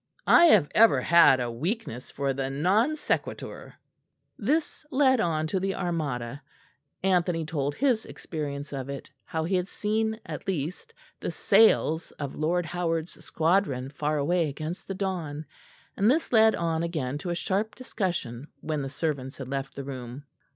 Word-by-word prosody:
I 345 - +7
have 310 - +6
ever 215 - +6
had 170 -3 +6
a 120 -1 -2
weakness 150 - -4
for 140 -1 -1
the 135 0 -2
non 195 - +2
sequitur." 310 - -3 0.6
This 295 +11 -1
led 265 -2 +4
on 155 -5 +1
to 185 +4 -1
the 195 +1 -1
Armada; 145 -7 -3 0.6
Anthony 175 -3 +2
told 145 -2 -2
his 250 -5 +1
experience 145 -3 -6
of 135 -1 -4
it; 140 0 -7
how 160 -1 -2
he 175 +4 -2
had 180 0 -1
seen 220 +1 -1
at - - -7
least 180 - -3 0.3
the - - -3
sails 165 -7 +3
of 140 -2 -6
Lord 170 +3 0
Howard's 165 -1 -3
squadron 160 -6 +1
far 150 +1 -1
away 165 +2 +1
against 155 +5 -6
the 195 - -4
dawn; 170 -6 -3 0.5
and 205 +3 +3
this 315 +6 +1
led 220 -1 +6
on 165 -1 -1
again 150 -5 -2
to 175 - -5
a 175 - -1
sharp 200 +5 -1
discussion 175 - -3
when 155 -2 -2
the 135 - -4
servants 140 -3 -3
had 135 -2 -7
left 135 0 -4
the 140 - -5
room. 130 0 -7
165 Hz, 160 wpm, -27 LUFS, 140-195 Hz, 0.6 s, I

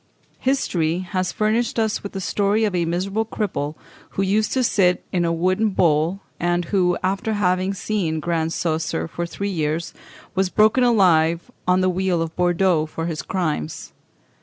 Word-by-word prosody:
History 175 -11 0
has 185 0 0
furnished 220 +3 0
us 220 -1 0
with 200 - -7
the 195 - -3
story 205 +3 +1
of 210 -3 +1
a 175 -2 +1
"miserable 190 +6 -1
cripple" 180 -9 -3 0.4
who 195 - +2
used 210 +3 +1
to 260 - +2
sit 180 -6 +2
in 175 -2 +1
a 165 - +1
wooden 185 +6 +1
bowl, 170 0 +1 0.2
and 175 0 0
who, 180 -2 +1
after 195 +4 0
having 185 -1 +1
been 175 -7 0
Grand 165 0 -1
Coesre 160 -1 -1
for 170 +1 -4
three 200 +3 -4
years, 160 -1 -2 0.4
was 190 -1 +1
broken 215 +6 +4
alive 170 -8 +3 0.2
on 180 +1 +4
the 185 - +2
wheel 180 -2 0
at 160 0 -7
Bordeaux 175 -2 +2
for 165 +1 -5
his 160 -3 -3
crimes. 155 - -3
185 Hz, 165 wpm, -22 LUFS, 165-200 Hz, 0.4 s, broken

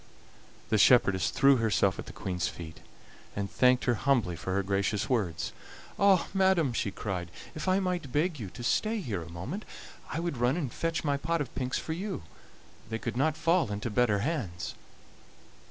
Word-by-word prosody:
The 110 - +3
shepherdess 95 -7 +5
threw 135 -1 +5
herself 105 -4 +2
at - - -6
the - - -7
Queen's 90 -2 -2
feet, 80 -2 -8 0.6
and 100 -1 -3
thanked 125 0 +4
her 120 - +3
humbly 120 -7 +1
for 95 +3 -3
her 100 - +1
gracious 100 +1 0
words. 90 -10 -1 0.5
"Ah! 195 -3 +5
madam," 190 -8 +3
she 115 - 0
cried, 90 -3 -4 0.2
"if 155 +2 -5
I 185 +1 +4
might 180 -7 -2
beg 150 +2 0
you 105 -5 -5
to 120 +6 -9
stay 215 - +1
here 110 - -3
a 85 - -9
moment 90 - -5 0.5
I 160 - -2
would 170 -5 -2
run 125 +5 +2
and 140 -9 -3
fetch 165 -2 -1
my 145 -2 +1
pot 165 +4 -1
of 145 - -4
pinks 130 -1 -2
for 160 - -3
you 190 - -4 0.7
they 110 - -2
could - - -4
not 150 +4 +1
fall 165 - +2
into 105 +3 -3
better 115 -2 +3
hands." 105 - -3
125 Hz, 185 wpm, -29 LUFS, 100-160 Hz, 0.7 s, shepherdess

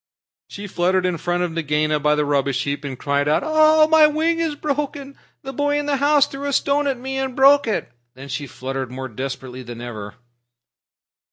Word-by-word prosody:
She 205 - -8
fluttered 185 -1 0
in 180 -3 -1
front 175 +2 -1
of 175 - -2
Nagaina 155 -1 0
by 150 +1 +2
the 150 0 0
rubbish 140 -2 0
heap 140 0 -3
and 135 -3 -5
cried 140 +2 0
out, 150 - +2
"Oh, 310 0 +5
my 315 -1 +6
wing 320 +2 0
is 320 -3 -1
broken! 285 -1 -4 0.3
The 270 0 -6
boy 290 +2 0
in 290 - -2
the 290 -1 0
house 290 +1 +4
threw 280 0 -7
a 280 - -2
stone 285 +2 +1
at 270 -2 -1
me 265 +2 -5
and 265 -2 -3
broke 275 0 +5
it." 205 - -2 0.2
Then 135 +2 -10
she 140 +1 -4
fluttered 130 +1 -5
more 130 +1 -6
desperately 130 +1 -6
than 120 -1 -9
ever. 110 -4 -7
180 Hz, 200 wpm, -21 LUFS, -, 0.3 s, my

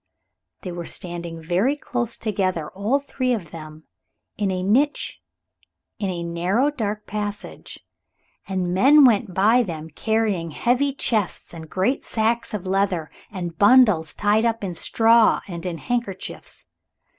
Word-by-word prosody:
They 185 - -5
were 175 -1 -6
standing 170 -2 -6
very 180 - +1
close 240 -4 -3
together, 185 -7 -2
all 210 +9 0
three 260 -2 -2
of 180 -9 -5
them, 155 -1 -10 0.5
in 205 -2 -1
a 185 -1 -2
niche 265 +10 +1 0.8
in 200 -2 -1
a 175 -2 -3
narrow, 180 +11 0
dark 215 -6 -4
passage, 210 0 -6 0.6
and 185 -2 -2
men 275 +9 +6
went 210 -6 +2
by 220 +6 +4
them 160 -7 -5
carrying 215 -6 -1
heavy 250 - +1
chests, 220 -10 -2
and 160 -2 -9
great 200 +9 0
sacks 230 +1 0
of 205 -3 -5
leather, 190 -4 0 0.2
and 175 -3 -6
bundles 205 -8 +5
tied 210 +2 +2
up 230 -2 0
in 185 -3 -3
straw 225 +5 +3
and 175 -1 -6
in 170 -2 -4
handkerchiefs. 235 -3 -5
200 Hz, 140 wpm, -23 LUFS, 175-230 Hz, 0.8 s, men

